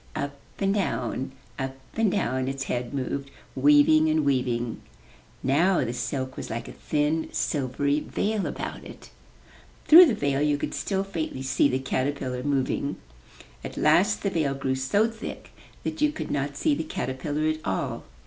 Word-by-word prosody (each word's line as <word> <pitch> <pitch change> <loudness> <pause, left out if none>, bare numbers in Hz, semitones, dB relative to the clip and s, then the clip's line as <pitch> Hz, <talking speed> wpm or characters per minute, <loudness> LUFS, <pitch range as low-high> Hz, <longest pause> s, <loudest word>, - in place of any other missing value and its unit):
Up 140 0 -3 0.2
and 195 0 +1
down, 135 - -1 0.3
up 135 0 -3 0.2
and 225 -3 +2
down 130 -2 0
its 135 0 -2
head 120 -2 -3
moved, 140 0 -3 0.3
weaving 150 +3 +5
and 155 -1 +2
weaving. 125 -4 0 0.6
Now 165 +6 +3
the 120 - -3
silk 130 +1 -3
was - - -6
like 115 +1 -4
a - - -7
thin, 150 +2 -1
silvery 140 +1 0
veil 210 +6 -1
about - - -5
it. - - -12 0.7
Through 345 +3 +10
the 240 - +1
veil 140 -6 0
you 150 -1 +2
could - - -4
still 195 -1 -1
faintly 160 -8 -4
see 135 +1 +3
the 130 - +1
caterpillar 130 -1 -2
moving. 140 +1 0 0.7
At - - -7
last 180 +8 +3
the 200 - 0
veil 150 -6 0
grew 135 -1 -1
so 135 +12 +2
thick 225 0 -8 0.3
that - - -4
you 300 0 +4
could 310 - -5
not 140 0 -2
see 145 - +2
the 155 +3 -1
caterpillar 145 +3 -2
at 155 0 -1
all. 95 -1 -2
145 Hz, 165 wpm, -26 LUFS, 130-160 Hz, 0.7 s, Through